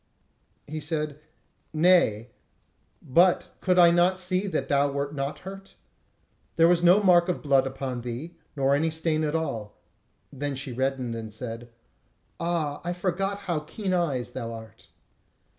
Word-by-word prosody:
He 155 +2 -5
said: 150 -1 -3 0.5
"Nay, 155 - +3 0.7
but 175 +7 +3
could 185 -1 +2
I 170 -1 +8
not 175 +2 +3
see 185 0 0
thee 205 - -4
that 155 -7 -2
thou 140 0 +2
wert 140 +1 -3
not 140 0 -3
hurt? 195 +1 -10 0.8
There 165 0 +5
was 175 0 +3
no 180 +4 +5
mark 175 -2 +5
of 180 - -2
blood 135 -2 +3
upon 130 -2 -4
thee, 125 +8 -6 0.2
nor 135 -1 +2
any 155 +3 +2
stain 160 0 -1
at 155 +1 -1
all." 135 -10 -3 0.6
Then 140 0 -3
she 135 0 -5
reddened, 130 -1 -1
and 110 -1 -6
said: 115 +1 -7 0.7
"Ah, 165 -4 -1
I 175 +1 -2
forgot 195 +3 -2
how 170 -4 0
keen 185 +5 -4
eyes 150 -9 -1
thou 115 -3 -5
art." 110 -1 -11
150 Hz, 155 wpm, -26 LUFS, 135-175 Hz, 0.8 s, I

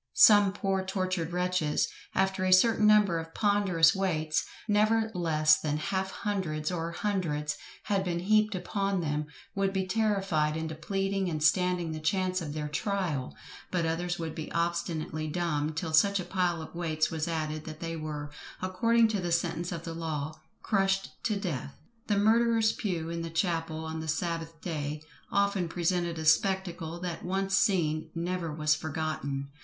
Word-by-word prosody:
Some 205 -2 +8
poor 195 -1 -1
tortured 185 -3 -2
wretches, 180 -4 +1 0.3
after 190 0 +1
a 185 - +2
certain 210 +3 +5
number 210 -5 +5
of 165 0 -9
ponderous 195 -6 +4
weights, 160 -5 0 0.2
never 220 +1 +3
less 155 -3 +3
than 150 -1 -1
half 190 +5 -1
hundreds 180 -8 -2
or 170 -1 -2
hundreds, 170 -7 -1 0.3
had 200 -2 0
been 170 -2 -2
heaped 215 +2 +3
upon 195 0 -1
them, 150 -1 -2 0.3
would 195 0 +1
be 190 -1 -1
terrified 195 -7 +1
into 160 0 -3
pleading 195 +4 -1
and 155 -2 -2
standing 180 -1 +2
the 155 - -4
chance 185 +3 0
of 150 -3 -5
their 150 -1 -3
trial; 160 -4 -2 0.3
but 175 -3 0
others 175 +2 -1
would 165 -2 -4
be 160 -1 -6
obstinately 170 -2 -1
dumb 155 -2 -1
till 160 0 -4
such 200 +5 +4
a 180 - -4
pile 175 -3 0
of - - -11
weights 160 -2 0
was 160 0 -2
added, 155 -2 -3
that 155 -1 -8
they 165 0 -4
were, 150 -2 -5 0.3
according 225 +5 +3
to 210 -3 -1
the 175 -1 -2
sentence 170 0 0
of 170 -1 -5
the 165 - -5
law, 155 -2 -3 0.3
crushed 195 -2 +1
to 215 - +1
death! 150 -8 -4 0.3
The 205 - +2
murderer's 225 +1 +4
pew 170 -5 -3
in 170 0 -3
the 165 - -4
chapel, 165 -1 -1
on 160 0 -4
the 160 - -5
sabbath 165 0 -3
day, 150 -3 -4 0.3
often 200 -3 +1
presented 175 0 0
a 160 - -4
spectacle, 175 -1 +1
that 175 -2 -4
once 195 +1 0
seen, 165 -6 +2
never 170 -1 -2
was 150 0 +2
forgotten. 145 -3 -3
170 Hz, 165 wpm, -29 LUFS, 155-195 Hz, 0.3 s, Some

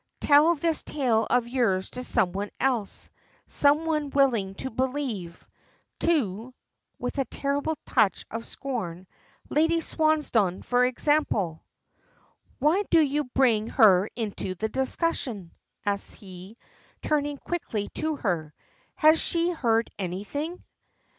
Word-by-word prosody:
Tell 300 +4 +5
this 325 +1 0
tale 245 -7 0
of 245 -1 +2
yours 230 -7 0
to 250 - -4
some 220 -8 +2
one 200 +2 -4
else 240 -6 -1 0.4
some 290 +3 +3
one 305 -3 -1
willing 235 -9 +2
to 260 +5 -5
believe 250 -9 -3 0.5
to" 250 - 0 0.4
with - - -4
a 270 - +1
terrible 285 +5 -2
touch 215 -6 +1
of 225 +1 -4
scorn 190 -10 -5 0.4
"Lady 325 +2 +2
Swansdown, 300 - +1
for 245 0 +2
example." 250 - 0 0.9
"Why 305 +8 +3
do 335 - +5
you 295 -1 +1
bring 240 -4 +2
her 205 -4 +5
into 205 -4 -3
the 220 +5 -3
discussion?" 260 - -2 0.3
asks 200 -1 -1
he, 190 +2 -12 0.5
turning 290 -1 0
quickly 230 -12 -4
to 315 0 -2
her. 170 - -2 0.4
Has 315 0 +5
she 340 +1 +1
heard 230 -8 +1
anything? 210 - -4
250 Hz, 120 wpm, -26 LUFS, 205-295 Hz, 0.9 s, Tell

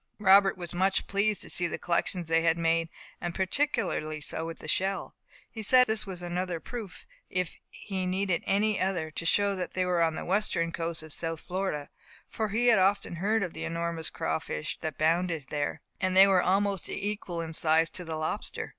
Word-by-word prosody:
Robert 195 -1 +5
was 175 -2 -4
much 190 +2 +2
pleased 200 +1 0
to - - -8
see 175 - +1
the - - -4
collections 175 0 -1
they 165 0 +3
had 165 0 +2
made, 165 0 +1 0.3
and 175 -1 -3
particularly 190 - 0
so 160 +2 -4
with 165 - -6
the - - -10
shell. 190 +5 0 0.4
He 220 - -6
said 250 +4 +6
that 250 - +4
this 215 -1 0
was 180 -2 -5
another 175 0 -2
proof, 215 +2 -8 0.2
if 180 -2 -2
he 190 -3 -4
needed 185 -1 0
any 205 +1 +2
other, 180 -4 -1
to 165 - -4
show 200 +2 +3
that 180 -2 -5
they 185 0 +1
were 180 -1 +1
on 165 -1 +2
the - - -5
western 180 -3 +1
coast 165 -1 -3
of 155 -2 -6
South 165 -1 -3
Florida, 180 -6 -3 0.4
for 220 -1 -2
he 225 +4 0
had 235 -4 +6
often 195 -2 +1
heard 210 +4 +1
of 180 - -4
the - - -6
enormous 165 -1 -3
crawfish 155 -1 -3
that 155 -3 -4
abounded 165 -1 +1
there, 145 -1 -2 0.2
and 185 0 +1
that 195 +1 +10
were 190 -2 +4
almost 195 0 +1
equal 205 -4 -3
in 165 -1 -4
size 160 +1 +4
to 180 - -3
the 160 -2 -5
lobster. 155 0 -3
180 Hz, 200 wpm, -29 LUFS, 165-195 Hz, 0.4 s, that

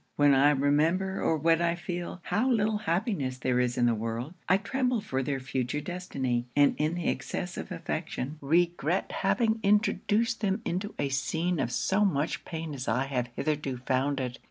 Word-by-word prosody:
When 145 -1 +5
I 135 +2 +6
remember, 155 +7 +2
or 160 - +2
when 165 +2 +3
I 170 0 +2
feel, 175 0 -5
how 245 +6 +1
little 215 -3 +2
happiness 170 - 0
there 125 -1 +1
is 125 0 0
in 120 - +3
the 120 - +4
world, 115 +6 -3 0.2
I 190 - +6
tremble 250 +3 0
for 135 -11 -2
their 135 +1 -2
future 130 +2 -2
destiny; 135 -8 -2
and 145 -1 +5
in 155 +3 +1
the 175 - -2
excess - - -3
of - - -6
affection, 145 +5 -4
regret 170 +3 +1
having 220 +2 +1
introduced 220 +3 +2
them 195 -2 0
into 190 +4 -3
a 140 - -1
scene 160 +5 -1
of 120 - -1
so 195 +10 +1
much 155 -5 0
pain 160 -2 -5
as 130 -2 -5
I 130 +2 +1
have 125 -3 -2
hitherto 145 -4 -1
found 130 +2 0
it. 125 -2 -4
155 Hz, 180 wpm, -29 LUFS, 135-190 Hz, 0.2 s, I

